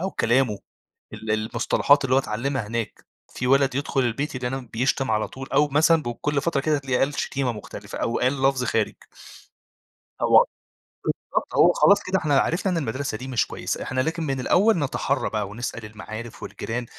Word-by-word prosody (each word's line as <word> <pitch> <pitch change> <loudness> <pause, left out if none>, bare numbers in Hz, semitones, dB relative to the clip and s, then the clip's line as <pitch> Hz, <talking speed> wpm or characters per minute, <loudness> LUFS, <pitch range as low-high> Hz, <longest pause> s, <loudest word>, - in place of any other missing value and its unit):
أو 190 +2 -2
كلامه، 120 -3 +1 0.6
ال 110 -1 -4
المصطلحات 115 +6 +2
اللي 130 -1 +2
هو 135 - +6
اتعلّمها 120 0 -2
هناك. 115 0 -4 0.3
في 125 - -2
وَلَد 135 0 +3
يدخل 140 0 0
البيت 130 +4 -1
يلاقينا 125 0 -4
بيشتم 130 +1 0
على 110 -1 +1
طول، 135 +4 -9
أو 145 +2 +4
مثلًا 155 +3 +4
ب 120 - -2
كل 145 -1 0
فترة 155 -4 0
كده، 155 +1 +2
هتلاقيه 135 -3 -1
قال 135 +2 +1
شتيمة 135 -3 -1
مختلفة، 105 - -8
أو 115 - -1
قال 130 +2 +1
لَفظ 135 -1 +3
خارج. 115 -3 0 1.3
هو - - +6 0.9
بالضبط. - - -1
هو - - +6
خلاص 200 0 +5
كده 185 +1 0
إحنا 145 -4 +2
عرفنا 185 +3 0
إن 175 - 0
المدرسة 130 -4 -2
دي 130 - -8
مش 125 -3 0
كويسة. - - -4
إحنا 130 - -1
لكن 165 +3 -2
من 135 -3 -2
الأول 200 - +3
نَتَحرّى 140 -1 -1
بقى، 105 -2 -2
ونسأل 115 +1 -5
المعارف، 110 +2 -8
والجيران: 120 +1 -4
130 Hz, 180 wpm, -24 LUFS, 115-145 Hz, 1.3 s, هو